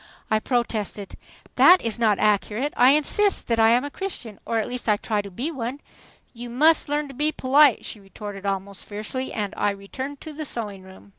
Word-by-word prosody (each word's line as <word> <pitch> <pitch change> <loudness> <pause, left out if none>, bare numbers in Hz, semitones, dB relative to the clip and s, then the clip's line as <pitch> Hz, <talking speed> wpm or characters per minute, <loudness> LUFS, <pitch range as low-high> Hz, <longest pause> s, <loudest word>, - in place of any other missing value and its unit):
I 215 - +3
protested. 215 -4 -2 0.4
"That 365 +1 +8
is 230 0 -2
not 215 -4 +3
accurate. 215 +6 0
I 255 +3 +6
insist 390 +7 +2
that 230 -1 0
I 225 0 +6
am 240 +3 +3
a 290 - -6
Christian, 255 - -6
or 230 - 0
at 220 - -1
least 245 -2 -4
I 210 - +4
try 210 0 -1
to 200 - -9
be 250 - -4
one." 260 -1 -5 0.5
"You 240 0 -8
must 310 +6 +3
learn 295 0 -1
to - - -9
be 300 +4 0
polite," 275 -2 +4
she 215 - -7
retorted 200 0 -9
almost 195 0 -4
fiercely, 215 +6 -5
and 210 -3 -3
I 205 - +1
returned 260 +8 -6
to 310 - -8
the 310 +1 -5
sewing 210 -8 -5
room. 190 +1 -15
230 Hz, 205 wpm, -24 LUFS, 205-280 Hz, 0.5 s, That